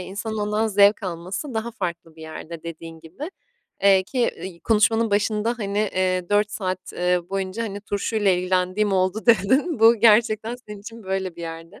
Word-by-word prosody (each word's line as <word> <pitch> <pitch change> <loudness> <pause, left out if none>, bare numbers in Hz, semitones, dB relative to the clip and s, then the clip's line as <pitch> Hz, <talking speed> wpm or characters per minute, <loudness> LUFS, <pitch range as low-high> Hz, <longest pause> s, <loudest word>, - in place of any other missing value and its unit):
insanın 210 +4 -5
ondan 210 +1 0
zevk 205 0 +4
alması 185 - -5
daha 225 +1 -2
farklı 170 -6 -5
bir 160 - -11
yerde 160 +1 -8
dediğin 165 0 -9
gibi. 180 - -8 0.5
Eee, 195 -1 +6
ki, 245 +7 -4
i 170 -1 -6
konuşmanın 225 +2 +2
başında, 210 +3 +1
hani, 200 -1 -2
eee, 185 -3 0
"4 205 0 +2
saat, 185 -3 -4
eee, 180 0 +1
boyunca, 195 +3 -3
hani, 205 -2 -5
turşuyla 205 0 0
ilgilendiğim 185 +3 +1
oldu." 190 +4 0
dedin. 260 - +3
Bu 225 +2 +7
gerçekten 220 +1 +4
senin 210 -5 -11
için 225 +2 -10
böyle 190 -2 -3
bir - - -9
yerde. 165 +2 -8
200 Hz, 170 wpm, -23 LUFS, 180-220 Hz, 0.5 s, Bu